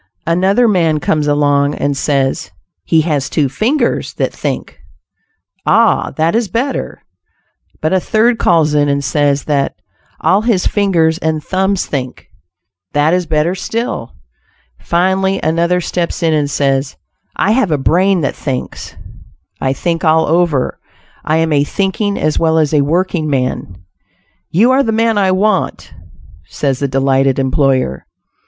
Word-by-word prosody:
Another 190 +8 +2
man 165 -7 +2
comes 150 0 0
along, 145 -1 +2
and 145 0 -1
says 135 -1 -1 0.4
"he 160 - +3
has 150 -4 -1
two 150 -4 +1
fingers 230 - -1
that - - -2
think." - - -5 0.8
"Ah! - - +3
that 160 +1 +1
is 230 -1 +1
better." 250 +8 -3 0.8
But 155 +3 0
a 190 - +3
third 225 +5 +1
calls 160 -3 +2
in 145 -1 +2
and 140 0 0
says 145 0 +1
that 140 -2 -1 0.4
"all 195 +2 +2
his 220 -5 0
fingers 170 -5 +1
and 160 -2 -2
thumbs 190 0 0
think." 130 -3 -5 0.6
That 145 +3 +2
is 180 -1 0
better 155 +2 +1
still. 225 - -4 0.6
Finally 190 +2 0
another 170 +3 +1
steps 175 0 -3
in 160 -1 +2
and 150 -2 0
says, 135 -1 -1 0.4
"I 200 - +1
have 225 -4 +2
a 150 - +1
brain 180 +6 +2
that 140 - -2
thinks; 130 -3 -5 0.7
I 130 - +1
think 165 +4 -2
all 160 0 +3
over; 160 -4 0 0.4
I 155 - +1
am 160 -1 +1
a 145 -1 +3
thinking 200 +5 -1
as 155 0 0
well 160 -1 +2
as 155 -1 +1
a 150 - +4
working 165 +1 0
man!" 125 -9 -2 0.7
"You 225 +9 +3
are 265 +1 +4
the 230 - 0
man 225 -1 +1
I 190 -2 +2
want," 190 +1 -1 0.5
says 135 +5 -2
the 140 - 0
delighted 135 0 +1
employer. 130 - 0
160 Hz, 145 wpm, -15 LUFS, 145-190 Hz, 0.8 s, a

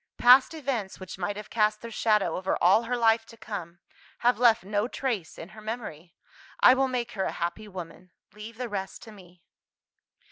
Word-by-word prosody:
Past 255 +6 +6
events 255 -10 -4
which 185 0 -9
might 200 +3 -3
have 210 - -9
cast 215 -1 +1
their 230 - -7
shadow 215 -2 +1
over 185 +1 -1
all 190 +5 +5
her 245 +1 -1
life 225 -1 +3
to 230 - -14
come, 175 -7 -7 0.5
have 245 -2 +3
left 235 -2 +4
no 205 +3 -1
trace 235 -10 -4
in 165 - -9
her 215 0 -13
memory. 210 -7 -7 0.4
I 250 - +8
will 265 +1 +2
make 245 -2 -3
her 195 -4 -2
a - - -2
happy 175 +6 -4
woman. 180 -1 -9 0.2
Leave 215 +2 -10
the 250 0 -4
rest 195 -3 -6
to 220 - -12
me." 180 -4 -17
215 Hz, 190 wpm, -27 LUFS, 190-235 Hz, 0.5 s, I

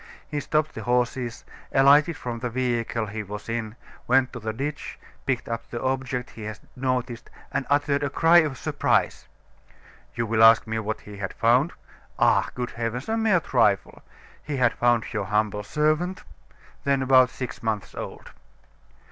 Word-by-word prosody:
He 150 - -3
stopped 155 +1 0
the 110 - -6
horses, 125 +1 -1 0.3
alighted 145 +4 +5
from 120 -4 -5
the 125 +1 -3
vehicle 120 -2 -1
he 110 +1 -5
was 105 +1 -8
in, 115 -1 -3 0.3
went 130 0 +3
to 125 - -6
the 110 0 -3
ditch, 140 +6 -5 0.3
picked 130 -3 -1
up 115 0 -5
the 120 - -4
object 130 -1 -2
he 110 - -9
had 110 -1 -5 0.2
noticed, 125 -2 -2 0.2
and 135 - -2
uttered 145 0 +2
a 140 - 0
cry 165 +4 +5
of 150 -5 0
surprise. - - 0 0.9
You 115 - -1
will 110 0 +1
ask 115 0 +7
me 110 0 -2
what 110 0 -4
he 105 -1 -11
had 95 -2 -4
found? 125 +8 +3 0.4
Ah! - - +3
good 125 0 -3
heavens! 115 +3 -4
A 225 - +1
mere 220 -6 +3
trifle. 115 -9 +1 0.4
He 150 -2 -4
had 125 -3 +3
found 120 -2 +1
your 105 -3 -2
humble 105 0 0
servant, 155 - 0 0.6
then 140 -1 +1
about 130 -1 +5
six 130 -1 -6
months 110 -3 -3
old." - - -8
125 Hz, 165 wpm, -25 LUFS, 115-140 Hz, 0.9 s, ask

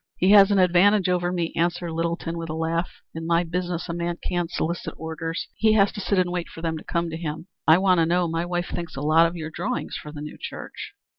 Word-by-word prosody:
"He 185 +2 +3
has 200 -1 +8
an 200 - +3
advantage 185 +2 +4
over 175 -1 +1
me," 170 -2 -2
answered 175 0 0
Littleton 165 +1 -2
with 165 -1 -5
a 155 - -3
laugh. 165 +2 -1 0.2
"In 165 0 -5
my 170 +1 +3
business 175 0 -3
a 170 - -3
man 170 0 -2
can't 175 -2 -1
solicit 170 0 -3
orders. 160 +1 -4
He 220 -1 +4
has 200 -2 +4
to 205 - -6
sit 200 +1 0
and 180 -1 +2
wait 175 -1 -3
for 165 - -10
them 165 -1 -1
to - - -13
come 170 -1 -2
to 160 - -4
him." 160 -1 -5 0.2
"I 160 +1 +8
want 185 -1 +3
to 165 - +3
know. 175 +1 +2
My 165 +1 -1
wife 175 0 -2
thinks 170 -1 -5
a 135 - -4
lot 160 +3 +5
of 165 - -6
your 160 -2 -5
drawings - - -3
for 150 - -7
the 150 -1 -8
new 150 - -8
church." - - -8
170 Hz, 250 wpm, -24 LUFS, 165-180 Hz, 0.2 s, has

